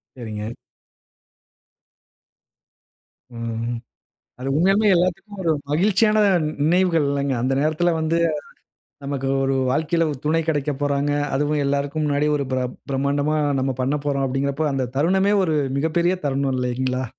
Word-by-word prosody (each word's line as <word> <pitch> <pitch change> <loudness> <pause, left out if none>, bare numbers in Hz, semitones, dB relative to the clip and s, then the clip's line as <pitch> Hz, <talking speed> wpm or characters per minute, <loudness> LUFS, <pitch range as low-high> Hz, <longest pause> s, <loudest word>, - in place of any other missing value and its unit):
சரிங்க. 110 -4 -6 2.9
ம்ஹ்ம். 115 0 -3 0.6
அது 135 +2 -3
உண்மையாலுமே 195 +5 +3
எல்லாதுக்கும் 190 +4 -1
ஒரு 165 - +2 0.2
மகிழ்ச்சியான 210 +7 +3 0.2
நி 150 - -1 0.2
நினைவுகள் 170 -2 +3
இல்லேங்க. 140 -1 0
அந்த 130 +2 +1
நேரத்துல 155 +3 +1
வந்து, 160 +1 0 0.9
நமக்கு 140 -1 -2 0.2
ஒரு 135 0 +1 0.2
வாழ்க்கையில 160 +3 +1
ஒரு 145 - -5
துணை 165 +2 +2
கிடைக்க 145 -1 0
போறாங்க. 145 0 +1 0.3
அதுவும் 145 +1 0
எல்லாருக்கும் 140 +2 -1
முன்னாடி 145 +1 +1
ஒரு 140 -2 -2
பிரப் 125 -1 -2
பிரமாண்டம்மா 140 +3 0 0.2
நம்ம 135 -1 -1
பண்ணப்போறோம், 140 0 0
அப்பிடீங்கிறப்ப. 140 +3 -1
அந்த 130 -2 -1
தருணமே 190 +6 +3
ஒரு 160 -3 0 0.2
மிகப்பெரிய 170 +4 +1
தருணம் 135 -1 0
இல்லேங்களா! 125 +1 -1
145 Hz, 120 wpm, -22 LUFS, 135-165 Hz, 2.9 s, உண்மையாலுமே